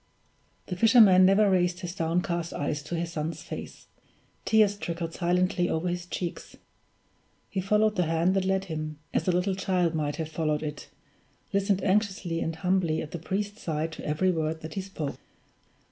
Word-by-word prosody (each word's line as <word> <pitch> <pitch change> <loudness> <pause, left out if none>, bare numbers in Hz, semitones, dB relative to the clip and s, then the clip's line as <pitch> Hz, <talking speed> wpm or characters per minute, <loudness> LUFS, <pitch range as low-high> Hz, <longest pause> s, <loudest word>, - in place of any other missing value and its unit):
The 180 - -4
fisherman 200 -3 +7
never 200 +2 +5
raised 180 -1 +2
his 175 -2 -5
downcast 170 -1 -1
eyes 150 +1 -2
to 170 - -5
his 170 0 -2
son's 155 0 -4
face; - - -8 0.6
tears 215 -2 +4
trickled 170 -4 -4
silently 180 0 +1
over 160 +3 -1
his 175 0 -4
cheeks; 175 -1 -5 0.9
he 190 - -1
followed 210 +2 +2
the 180 -3 +2
hand 165 +3 +2
that 195 -1 +1
led 190 0 0
him, 155 -3 -5 0.2
as - - 0
a - - +5
little 180 +2 +1
child 185 -3 0
might 150 -2 -1
have 160 -2 -3
followed 155 -1 -1
it, 150 -1 -6 0.6
listened 195 -1 +1
anxiously 190 -4 0
and 165 0 -2
humbly 180 -2 +1
at 155 - -9
the 170 - -5
priest's 205 +5 -3
side 160 0 -2
to - - -9
every 155 +5 +1
word 160 -1 -2
that 160 - -7
he 195 - -2
spoke. 165 -7 -5
175 Hz, 175 wpm, -27 LUFS, 160-190 Hz, 0.9 s, fisherman